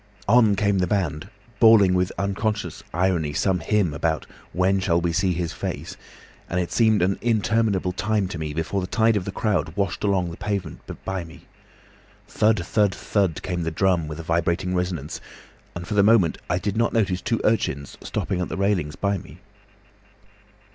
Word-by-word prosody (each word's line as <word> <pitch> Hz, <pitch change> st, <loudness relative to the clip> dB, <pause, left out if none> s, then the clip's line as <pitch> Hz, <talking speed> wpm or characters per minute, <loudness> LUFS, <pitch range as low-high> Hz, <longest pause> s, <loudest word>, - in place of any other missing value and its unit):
"On 110 Hz, -2 st, +5 dB
came 100 Hz, -1 st, +1 dB
the 90 Hz, -, +1 dB
band, 95 Hz, -3 st, -1 dB, 0.3 s
bawling 110 Hz, -5 st, +7 dB
with 90 Hz, 0 st, +1 dB
unconscious 100 Hz, +2 st, -2 dB
irony 85 Hz, -4 st, 0 dB
some 95 Hz, +4 st, +1 dB
hymn 90 Hz, -1 st, +1 dB
about 80 Hz, +1 st, -1 dB, 0.3 s
'When 95 Hz, +2 st, +2 dB
shall 85 Hz, -3 st, +2 dB
we 85 Hz, -1 st, -1 dB
see 90 Hz, +3 st, +1 dB
His 85 Hz, -1 st, -2 dB
face?' -, -, -5 dB, 0.5 s
and 90 Hz, -, 0 dB
it 90 Hz, -, -2 dB
seemed 110 Hz, -5 st, +3 dB
an 95 Hz, +1 st, 0 dB
interminable 110 Hz, -4 st, +1 dB
time 100 Hz, +1 st, 0 dB
to 85 Hz, -, -5 dB
me 75 Hz, -1 st, -3 dB
before 80 Hz, +6 st, -2 dB
the 90 Hz, -, -4 dB
tide 110 Hz, +2 st, +2 dB
of 95 Hz, -3 st, -1 dB
the 100 Hz, -, -3 dB
crowd 90 Hz, -6 st, -1 dB
washed 100 Hz, -2 st, -1 dB
along 95 Hz, -4 st, +1 dB
the 85 Hz, -, -9 dB
pavement 100 Hz, -6 st, -4 dB, 0.2 s
by 95 Hz, -2 st, -2 dB
me. 80 Hz, -1 st, -14 dB, 0.8 s
Thud, 105 Hz, -5 st, +1 dB
thud, 105 Hz, -1 st, +1 dB
thud, 95 Hz, -6 st, -1 dB
came 90 Hz, -1 st, -2 dB
the 80 Hz, -, -1 dB
drum 85 Hz, -1 st, +1 dB
with 75 Hz, +1 st, -6 dB
a -, -, -5 dB
vibrating 85 Hz, +2 st, 0 dB
resonance, 90 Hz, -5 st, -3 dB, 0.5 s
and 85 Hz, 0 st, -6 dB
for -, -, -3 dB
the 105 Hz, -, +4 dB
moment 100 Hz, -5 st, +4 dB
I 90 Hz, -, +1 dB
did 100 Hz, +2 st, -2 dB
not 115 Hz, +1 st, +1 dB
notice 95 Hz, -5 st, +1 dB
two 115 Hz, -, -1 dB
urchins 70 Hz, -10 st, 0 dB
stopping 90 Hz, -2 st, -2 dB
at 90 Hz, -, -3 dB
the -, -, -4 dB
railings 95 Hz, -6 st, 0 dB
by 100 Hz, -1 st, -1 dB
me. -, -, -13 dB
95 Hz, 180 wpm, -24 LUFS, 85-105 Hz, 0.8 s, bawling